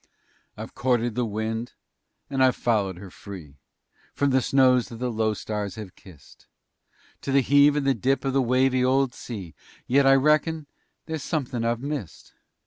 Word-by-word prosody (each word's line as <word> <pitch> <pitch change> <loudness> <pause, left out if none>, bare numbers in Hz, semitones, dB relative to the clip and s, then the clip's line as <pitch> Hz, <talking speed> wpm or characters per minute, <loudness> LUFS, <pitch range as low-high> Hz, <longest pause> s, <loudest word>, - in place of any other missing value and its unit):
I've - - -8
courted 120 -2 0
the 120 +1 -1
wind 110 +2 -3 0.5
and 135 -2 +1
I've 130 -1 +4
followed 100 -6 0
her 95 0 -11
free 90 -9 -10 0.6
From 140 -1 +1
the 130 0 +3
snows 130 -1 +3
that 115 - -9
the 125 +1 -3
low 110 -1 0
stars 105 -2 -4
have 105 -4 -9
kissed 90 -7 -18 0.7
To 140 - -4
the 135 0 +4
heave 145 +2 +5
and 145 -2 -1
the 135 - +3
dip 135 +1 0
of 135 - 0
the 135 - +3
wavy 130 +1 +2
old 130 0 +2
sea, 100 -8 -8 0.3
Yet 135 +2 +3
I 135 - +7
reckon 150 +2 +2 0.4
there's 160 -2 -4
somethin' 130 -5 -3
I've 115 0 -1
missed. 140 - -6
125 Hz, 170 wpm, -25 LUFS, 110-135 Hz, 0.7 s, I